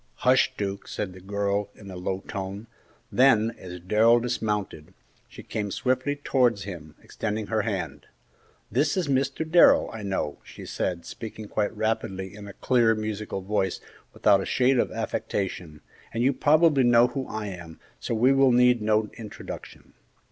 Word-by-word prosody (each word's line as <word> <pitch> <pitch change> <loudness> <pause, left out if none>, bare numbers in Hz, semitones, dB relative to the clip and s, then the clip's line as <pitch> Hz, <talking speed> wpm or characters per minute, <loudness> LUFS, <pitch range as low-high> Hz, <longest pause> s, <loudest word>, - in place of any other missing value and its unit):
"Hush, 130 +1 +4
Duke!" 100 -1 -4
said 95 -3 -4
the 95 - -13
girl, 100 +1 -1
in 100 -2 -11
a - - -8
low 95 +1 -3
tone; 100 +2 -5 0.5
then, 115 -4 +4
as 90 -1 -8
Darrell 110 +6 +4
dismounted, 105 -9 -3 0.3
she - - -11
came 105 -2 -3
swiftly 130 +6 0
towards 125 -7 +1
him, 85 -6 -9
extending 110 0 -3
her 110 0 0
hand. 100 -6 -4 0.6
"This 145 - +1
is 180 -4 0
Mr. 140 +3 0
Darrell, 170 +2 +5
I 115 - -6
know," 95 -7 -3
she - - -11
said, 85 -2 -3
speaking 110 -1 -8
quite 105 +1 -2
rapidly 95 -3 -2
in 100 0 -10
a 100 - -9
clear, 115 0 +2
musical 110 -2 -4
voice, 95 -1 -1 0.3
without 100 -1 +3
a - - -4
shade 130 0 +3
of - - +1
affectation, 90 -6 -4 0.3
"and 115 +1 -1
you 135 +2 +3
probably 155 0 +4
know 120 -1 +6
who 135 -2 -4
I 110 -1 -4
am, 85 -3 -10 0.2
so 115 - -3
we 125 +5 +4
will 135 -1 +5
need 125 -1 +4
no 105 0 +2
introduction." 110 -2 -9
110 Hz, 160 wpm, -26 LUFS, 95-125 Hz, 0.6 s, know